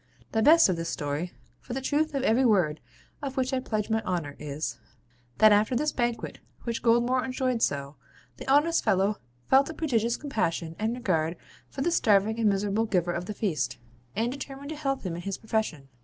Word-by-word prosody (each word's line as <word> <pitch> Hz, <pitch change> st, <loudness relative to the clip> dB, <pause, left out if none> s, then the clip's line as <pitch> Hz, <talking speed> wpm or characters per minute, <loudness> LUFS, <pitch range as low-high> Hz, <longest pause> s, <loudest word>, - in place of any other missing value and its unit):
The 220 Hz, -, +1 dB
best 325 Hz, +7 st, +7 dB
of 185 Hz, -3 st, 0 dB
this 165 Hz, 0 st, -3 dB
story 145 Hz, +4 st, -3 dB, 0.3 s
(for 240 Hz, -, -8 dB
the -, -, -1 dB
truth 295 Hz, +3 st, 0 dB
of 270 Hz, -, 0 dB
every 245 Hz, +1 st, +3 dB
word 180 Hz, -, +3 dB, 0.4 s
of 275 Hz, -1 st, -5 dB
which 260 Hz, +1 st, 0 dB
I 260 Hz, -, +2 dB
pledge 215 Hz, -4 st, -2 dB
my 220 Hz, 0 st, +2 dB
honour) 170 Hz, -8 st, -3 dB
is, 140 Hz, -4 st, -4 dB, 0.6 s
that 215 Hz, 0 st, +7 dB
after 210 Hz, +4 st, +3 dB
this 300 Hz, +4 st, +1 dB
banquet, 240 Hz, -2 st, -2 dB, 0.2 s
which 235 Hz, -1 st, -3 dB
Goldmore 240 Hz, +2 st, +3 dB
enjoyed 255 Hz, -2 st, -1 dB
so, 140 Hz, -3 st, -1 dB, 0.4 s
the -, -, -9 dB
honest 320 Hz, +4 st, +4 dB
fellow 195 Hz, +2 st, +2 dB, 0.3 s
felt 275 Hz, +2 st, +4 dB
a 320 Hz, -, -6 dB
prodigious 235 Hz, -6 st, 0 dB
compassion 170 Hz, -, -2 dB
and 220 Hz, +2 st, 0 dB
regard 165 Hz, -8 st, 0 dB, 0.3 s
for 270 Hz, -, -6 dB
the 345 Hz, -, +1 dB
starving 215 Hz, -, +3 dB
and 220 Hz, -2 st, +4 dB
miserable 205 Hz, +2 st, +1 dB
giver 175 Hz, -4 st, +1 dB
of 175 Hz, +1 st, -3 dB
the 210 Hz, -, -5 dB
feast, 185 Hz, -9 st, -1 dB, 0.4 s
and 230 Hz, +3 st, 0 dB
determined 275 Hz, +1 st, -7 dB
to 315 Hz, -, -4 dB
help 275 Hz, -3 st, -2 dB
him 180 Hz, -4 st, -3 dB
in 175 Hz, -, -5 dB
his 195 Hz, +1 st, -4 dB
profession. 215 Hz, -11 st, -2 dB
220 Hz, 195 wpm, -27 LUFS, 180-265 Hz, 0.6 s, best